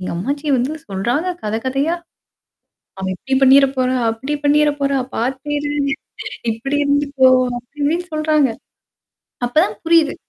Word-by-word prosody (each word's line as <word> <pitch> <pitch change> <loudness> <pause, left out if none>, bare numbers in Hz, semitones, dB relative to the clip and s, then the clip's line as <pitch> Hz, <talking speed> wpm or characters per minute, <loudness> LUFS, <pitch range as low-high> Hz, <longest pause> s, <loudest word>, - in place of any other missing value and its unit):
எங்க 185 - -4
அம்மாச்சி 280 - -3
வந்து 255 +5 -1 0.2
சொல்றாங்க 235 - -1 0.2
கதை 215 +1 -1
கதையா. 275 +6 0 1.0
"அவ 190 - -4
இப்படி 270 +9 -5
பண்ணிற 270 +1 +7
போறா, 255 0 +1
அப்படி 260 +6 -3
பண்ணிற 295 +1 +4
போறா, 275 -1 +1 0.2
பார்த்து 260 +5 -2
இரு. 290 0 -2 0.8
இப்படி 255 +6 -3
இருந்துக்கோ." 285 -2 +3 0.3
அப்டி 245 +5 -14
இப்படின்னு 330 +5 0
சொல்றாங்க. 305 -3 +2 1.0
அப்ப 245 - -4
தான் 210 - -4
புரியுது. 325 -3 +4
275 Hz, 135 wpm, -19 LUFS, 245-295 Hz, 1.0 s, பண்ணிற